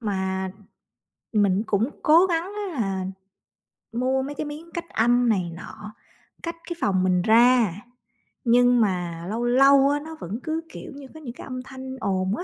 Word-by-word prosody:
Mà 190 Hz, -3 st, -2 dB, 0.8 s
mình 205 Hz, -1 st, +3 dB
cũng 215 Hz, +6 st, +1 dB
cố 330 Hz, +4 st, +6 dB
gắng 335 Hz, -3 st, 0 dB, 0.3 s
á -, -, -7 dB
là 190 Hz, -2 st, -2 dB, 0.9 s
mua 255 Hz, +3 st, 0 dB
mấy 285 Hz, +2 st, -5 dB
cái 310 Hz, -, -4 dB
miếng 305 Hz, +3 st, -8 dB
cách 340 Hz, -1 st, -5 dB
âm 240 Hz, +2 st, +3 dB
này 185 Hz, -6 st, +1 dB
nọ, 210 Hz, +4 st, -10 dB, 0.5 s
cách 335 Hz, 0 st, -4 dB
cái 345 Hz, -, -4 dB
phòng 185 Hz, -2 st, +1 dB
mình 180 Hz, -1 st, +2 dB
ra, 230 Hz, -1 st, +5 dB, 0.7 s
nhưng 245 Hz, 0 st, +4 dB
mà 175 Hz, -5 st, -1 dB
lâu 225 Hz, +3 st, -2 dB
lâu 275 Hz, +3 st, +5 dB
á 290 Hz, +1 st, +1 dB
nó 320 Hz, +2 st, -9 dB
vẫn 205 Hz, -, -5 dB
cứ, 320 Hz, 0 st, -2 dB
kiểu -, -, -9 dB
như, 280 Hz, -1 st, -10 dB
có 315 Hz, -, -11 dB
những 260 Hz, -6 st, -8 dB
cái -, -, -11 dB
âm 255 Hz, -1 st, -6 dB
thanh 260 Hz, 0 st, -8 dB
ồn 190 Hz, -2 st, 0 dB
á, -, -, -4 dB
240 Hz, 180 wpm, -24 LUFS, 195-280 Hz, 0.9 s, cố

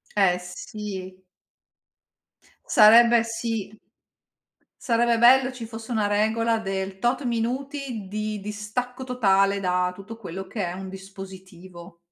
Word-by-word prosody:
Eh 185 Hz, -3 st, +4 dB
sì. 190 Hz, 0 st, -8 dB, 1.4 s
Sarebbe 235 Hz, +1 st, +7 dB
sì. 225 Hz, -2 st, -4 dB, 1.0 s
Sarebbe 235 Hz, -1 st, +2 dB
bello 255 Hz, +2 st, +6 dB
ci 245 Hz, -3 st, -8 dB
fosse 225 Hz, +1 st, -9 dB
una 215 Hz, -3 st, +1 dB
regola 220 Hz, +2 st, +1 dB
del 195 Hz, -2 st, -4 dB
tot 250 Hz, +5 st, 0 dB
minuti 245 Hz, -1 st, -3 dB
di 215 Hz, +1 st, -3 dB
distacco 215 Hz, +5 st, -5 dB
totale 200 Hz, -6 st, +2 dB
da 180 Hz, -1 st, 0 dB
tutto 200 Hz, +4 st, -10 dB
quello 190 Hz, -3 st, -7 dB
che 200 Hz, -2 st, -3 dB
è 175 Hz, -, -3 dB
un 190 Hz, +1 st, -7 dB
dispositivo. 190 Hz, -2 st, -11 dB
210 Hz, 115 wpm, -24 LUFS, 190-235 Hz, 1.4 s, Sarebbe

